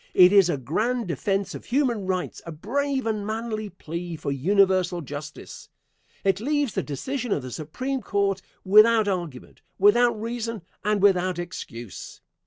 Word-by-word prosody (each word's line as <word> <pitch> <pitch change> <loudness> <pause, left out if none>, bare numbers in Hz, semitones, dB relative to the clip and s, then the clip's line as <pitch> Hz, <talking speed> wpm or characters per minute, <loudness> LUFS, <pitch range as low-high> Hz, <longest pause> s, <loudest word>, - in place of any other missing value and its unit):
It 180 +1 +7
is 195 -3 +6
a 150 - 0
grand 215 - -1
defence 195 +4 -1
of - - -8
human 240 -7 0
rights 185 -1 -2
a - - -5
brave 265 - -2
and 215 -2 -1
manly 215 0 -3
plea 170 -1 -6
for 145 - -4
universal 185 +3 +2
justice. 145 +1 -9 0.5
It 195 -1 +2
leaves 285 -1 0
the - - 0
decision 245 - -4
of 145 - 0
the 130 - -7
Supreme 255 - -4
Court 200 -2 0 0.2
without 215 +2 +6
argument, 175 -9 -4 0.2
without 230 +3 +4
reason, 230 -2 -4 0.2
and 210 -1 +1
without 185 -3 +3
excuse. 120 - -7
195 Hz, 150 wpm, -25 LUFS, 175-230 Hz, 0.5 s, It